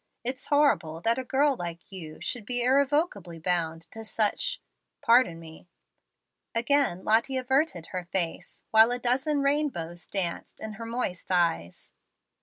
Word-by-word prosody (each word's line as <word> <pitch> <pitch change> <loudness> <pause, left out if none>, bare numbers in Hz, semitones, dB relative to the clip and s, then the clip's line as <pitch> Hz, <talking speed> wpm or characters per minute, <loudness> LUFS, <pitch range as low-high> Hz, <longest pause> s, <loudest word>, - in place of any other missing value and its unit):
It's 255 +2 -4
horrible 280 - +2
that 230 +6 +2
a - - -3
girl 275 +2 +2
like 170 -3 -7
you 160 -5 -9
should 245 -3 -2
be 245 +2 0
irrevocably 265 - +1
bound 165 -1 -1
to 225 - -8
such 220 - 0 0.4
pardon 230 -8 +4
me." 160 +1 -13 0.9
Again 235 -6 +1
Lottie 230 +5 +2
averted 265 - 0
her 180 -2 -4
face, 175 -2 -3
while 220 +1 +7
a 245 - -1
dozen 270 +4 +1
rainbows 265 - -1
danced 185 -4 -3
in 220 -1 -6
her 230 - -5
moist 230 -6 -3
eyes. 165 - 0
225 Hz, 140 wpm, -27 LUFS, 175-265 Hz, 0.9 s, while